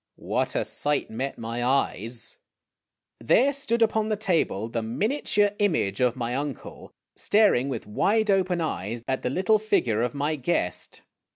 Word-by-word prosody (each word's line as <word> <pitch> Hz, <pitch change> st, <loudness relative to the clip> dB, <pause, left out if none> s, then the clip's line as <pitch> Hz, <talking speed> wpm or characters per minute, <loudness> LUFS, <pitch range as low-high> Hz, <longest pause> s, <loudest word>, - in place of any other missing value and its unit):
What -, -, -2 dB
a -, -, 0 dB
sight 145 Hz, -4 st, 0 dB
met 130 Hz, +5 st, -4 dB
my 115 Hz, +1 st, -4 dB
eyes! 120 Hz, -3 st, -1 dB, 0.8 s
There 275 Hz, +4 st, +3 dB
stood 235 Hz, -4 st, +1 dB
upon 220 Hz, -1 st, +1 dB
the 215 Hz, -, +1 dB
table 170 Hz, -, 0 dB
the 115 Hz, 0 st, -3 dB
miniature 205 Hz, -, +1 dB
image 160 Hz, -, +1 dB
of 125 Hz, -2 st, +2 dB
my 120 Hz, -1 st, -3 dB
uncle, 140 Hz, -2 st, -6 dB, 0.2 s
staring 205 Hz, -, +3 dB
with 135 Hz, -, -4 dB
wide 210 Hz, -, +1 dB
open 185 Hz, -3 st, +1 dB
eyes 115 Hz, -, -3 dB
at 130 Hz, 0 st, -1 dB
the -, -, -1 dB
little 190 Hz, +9 st, +2 dB
figure 120 Hz, -, +1 dB
of 120 Hz, +1 st, -1 dB
my 150 Hz, +2 st, -1 dB
guest. 125 Hz, -, -2 dB
140 Hz, 155 wpm, -26 LUFS, -, 0.8 s, There